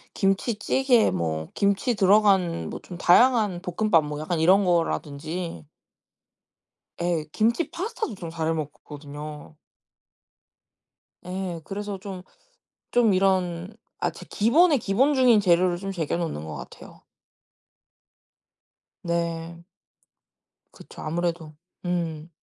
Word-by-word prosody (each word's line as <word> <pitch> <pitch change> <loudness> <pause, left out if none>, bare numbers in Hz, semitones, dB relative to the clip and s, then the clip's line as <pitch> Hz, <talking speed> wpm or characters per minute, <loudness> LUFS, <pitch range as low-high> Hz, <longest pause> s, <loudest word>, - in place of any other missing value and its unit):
김치찌개 225 +5 +2
뭐 80 -3 -2
김치 200 +5 +1
들어간 195 -4 +3
뭐 - - -6
좀 175 - -10
다양한 210 -1 +4
볶음밥 180 -2 +2
뭐 150 0 -5
약간 160 +1 -2
이런 190 +4 +5
거라든지 165 -1 -2 1.4
예. 170 -3 0
김치 235 +9 +1
파스타도 360 - -4
좀 170 -3 -7
잘해 165 0 -1
먹거든요. 150 0 -8 1.7
예. 180 -2 -4
그래서 205 +1 -5
좀 190 -2 -8 0.7
좀 235 -4 +4
이런 185 0 0 0.2
아 - - 0
제 - - -11
기본에 295 - +4
기본중인 250 +2 +3
재료를 180 -2 +3
좀 195 +1 -5
쟁여 165 -5 -2
놓는 155 - -4
것 80 - -6
같아요. - - -12 2.0
네. 170 0 -3 1.1
그쵸. - - -13
아무래도. 165 -1 -3 0.3
음. 170 -2 -2
180 Hz, 210 characters per minute, -25 LUFS, 165-205 Hz, 2.0 s, 이런